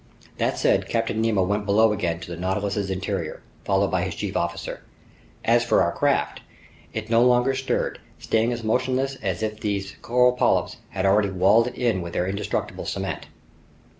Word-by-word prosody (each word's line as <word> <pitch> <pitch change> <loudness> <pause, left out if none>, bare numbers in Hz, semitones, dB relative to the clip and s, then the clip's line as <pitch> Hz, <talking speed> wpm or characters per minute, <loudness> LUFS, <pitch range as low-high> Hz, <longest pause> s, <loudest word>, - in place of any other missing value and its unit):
This - - 0
said, - - +2
Captain 115 -1 0
Nemo 110 -4 +2
went 105 +2 -1
below 110 +2 +4
again 85 -5 -1
to 90 - -8
the - - -4
Nautilus's 100 +3 -2
interior, 95 -1 -3 0.2
followed - - +2
by - - +1
his - - -3
chief - - -4
officer. 85 0 -3 0.6
As 120 +1 +4
for 115 - +3
our - - +1
craft, - - 0 0.5
it 110 +1 -5
no 115 0 +5
longer 125 +1 +4
stirred, 130 0 -1 0.2
staying 115 +2 +1
as 120 -1 -4
motionless 130 +4 0
as 95 0 -2
if 110 0 -3
these 100 -2 -3
coral 125 +1 +4
polyps 125 - +1
had 95 0 -2
already 100 +1 +4
walled 100 +5 +4
it 125 - -6
in 115 -7 0
with 85 -1 -6
their 90 - 0
indestructible 100 +2 -3
cement. - - -4
105 Hz, 175 wpm, -24 LUFS, 95-120 Hz, 0.6 s, no